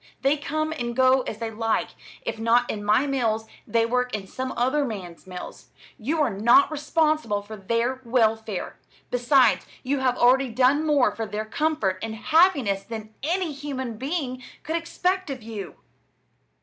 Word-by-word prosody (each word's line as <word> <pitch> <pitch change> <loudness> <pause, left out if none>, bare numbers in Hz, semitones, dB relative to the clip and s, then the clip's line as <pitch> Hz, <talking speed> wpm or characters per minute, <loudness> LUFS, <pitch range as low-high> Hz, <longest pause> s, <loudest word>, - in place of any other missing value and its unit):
They 275 +2 +4
come 310 +1 -2
and 240 0 -3
go 260 +1 +5
as 210 - -4
they 225 0 -4
like. 225 0 0 0.3
If 225 -1 -4
not 230 +2 +3
in 205 -1 -5
my 215 +6 +3
mills, 230 -6 0 0.2
they 230 -1 +2
work 250 0 0
in 200 -2 -5
some 260 +6 -5
other 260 +5 +2
man's 190 -8 -6
mills. 180 -1 -9 0.3
You 290 +9 -1
are 265 - +1
not 235 - +5
responsible 305 -8 0
for 215 +2 -9
their 230 +6 -1
welfare. 225 -4 0 0.3
Besides, 245 0 +3 0.2
you 275 +2 0
have 255 -1 +1
already 255 +2 +4
done 260 +6 +3
more 270 -9 +3
for 225 -1 -3
their 210 +1 -4
comfort 220 -7 0
and 225 -1 -4
happiness 280 - +3
than 220 +1 -8
any 335 +2 -1
human 265 -5 -5
being 270 -3 -3 0.2
could 320 - -2
expect 360 +2 -1
of 260 -4 -5
you!" 210 -5 -7
245 Hz, 160 wpm, -25 LUFS, 220-285 Hz, 0.3 s, go